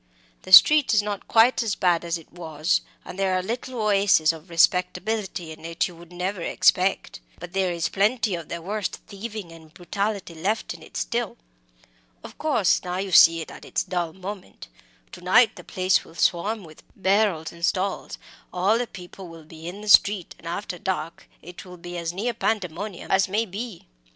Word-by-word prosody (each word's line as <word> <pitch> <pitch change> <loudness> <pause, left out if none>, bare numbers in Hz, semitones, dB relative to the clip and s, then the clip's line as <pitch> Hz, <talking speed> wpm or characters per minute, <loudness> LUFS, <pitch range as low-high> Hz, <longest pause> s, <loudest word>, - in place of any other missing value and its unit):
The 185 - -11
street 290 +5 +8
is 210 - +4
not 205 -1 -5
quite 230 +4 +4
as 220 -4 -1
bad 175 -3 +1
as 170 0 -2
it 165 - -17
was; 160 -1 -1 0.2
and 190 - -9
there 190 -1 +1
are 185 - 0
little 240 +4 -5
oases 200 -6 +3
of 160 +2 -13
respectability 180 +1 0
in 160 0 -12
it 165 +1 -1
you 175 - -12
would 170 +1 -15
never 180 +1 -3
expect. 185 +3 +1 0.2
But 175 +1 -10
there 190 -2 +1
is 170 -2 -1
plenty 210 +1 +1
of 170 -3 -5
the 170 -1 -5
worst 205 +2 -3
thieving 210 -3 -7
and 160 -1 -15
brutality 200 +2 -3
left 195 +7 -2
in - - -13
it - - -10
still. - - -2 0.9
Of - - -12
course, 250 - +2
now 180 0 -3
you 195 0 -3
see 165 -1 +7
it 160 - -8
at - - -12
its - - -2
dull 175 -3 -2
moment. 190 - -9 0.4
To - - -11
night 220 +7 +4
the - - -11
place 185 0 +1
will 165 - -17
swarm 200 +6 0
with 155 -2 -14
barrows 190 -5 +1
and 170 0 -14
stalls, 190 +2 -1 0.3
all 195 +6 +2
the 245 - -2
people 185 -1 -11
will 165 -2 -13
be 160 +1 -11
in 190 +4 -7
the 210 - -9
street, 200 -3 +5
and 165 - -11
after 180 0 -5
dark 170 -3 -4
it 175 +2 -10
will 180 -1 -12
be 175 +1 -9
as 170 -1 -3
near 215 +7 -2
pandemonium 200 -3 -3
as 190 0 +3
may 215 +4 0
be. 205 0 -7
185 Hz, 190 wpm, -24 LUFS, 170-205 Hz, 0.9 s, street